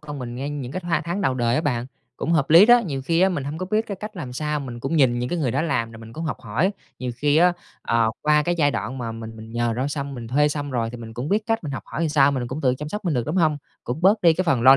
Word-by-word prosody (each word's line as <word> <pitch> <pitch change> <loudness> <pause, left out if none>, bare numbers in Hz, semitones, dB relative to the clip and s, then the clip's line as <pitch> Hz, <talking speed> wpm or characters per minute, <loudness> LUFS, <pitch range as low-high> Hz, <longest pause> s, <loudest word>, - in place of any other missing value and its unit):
con 145 -1 -7
mình 120 -2 -6
ngay 135 +3 -4
những 140 -3 -5
cái 185 - -3
tha 170 -3 0
tháng 175 +4 -2
đầu 135 -9 +1
đời 120 -1 +1
á 155 - +2
bạn, 125 -5 -1 0.3
cũng 170 - -1
hợp 150 -4 +2
lý 170 +6 +9
đó. 240 +1 +8
Nhiều 135 -4 -3
khi 165 +3 +2
á 190 - +5
mình 160 -7 -2
hông 145 +3 -4
có 185 - -3
biết 215 +4 0
cái 200 - -5
cách 215 -1 -7
làm 140 -8 -6
sao, 150 +2 -2
mình 120 -3 -7
cũng 135 +7 -1
nhìn 125 -5 +4
những 125 +1 -2
cái 175 - -2
người 140 -6 0
đó 140 +6 0
làm 115 -8 -1
rồi 115 - -11
mình 115 0 -11
cũng 160 +5 -5
học 150 - -3
hỏi. 130 - 0 0.3
Nhiều 125 -1 -3
khi 145 +3 +2
á, 180 +2 +5 0.3
ờ, 115 -1 +2
qua 150 0 +4
cái 175 +3 0
giai 145 -2 +4
đoạn 130 -1 -4
mà 115 -2 -4
mình 115 0 -8
mình 110 +1 -10
nhờ 120 0 0
đó 130 +3 0
xong, 140 -1 -4
mình 120 -3 -7
thuê 150 +4 +3
xong 145 -1 -3
rồi 115 -3 -1
thì 120 - -7
mình 115 -1 -9
cũng 125 +5 -4
biết 210 +3 +1
cách 225 -4 0
mình 145 - -4
học - - -4
hỏi 165 0 -2
sao, 145 -2 +4
mình 130 -3 -2
cũng 140 +4 -4
tự 130 -2 +2
chăm 150 +3 -6
sóc 210 +6 -5
mình 170 -4 0
được, 120 -2 -1
đúng 160 +5 -2
hông? 155 -4 +3 0.3
Cũng 125 +6 -3
bớt 200 +5 +4
đi 170 - +7
cái 175 - 0
phần 135 -9 +2
lo 130 +2 +9
145 Hz, 330 wpm, -23 LUFS, 125-165 Hz, 0.3 s, lý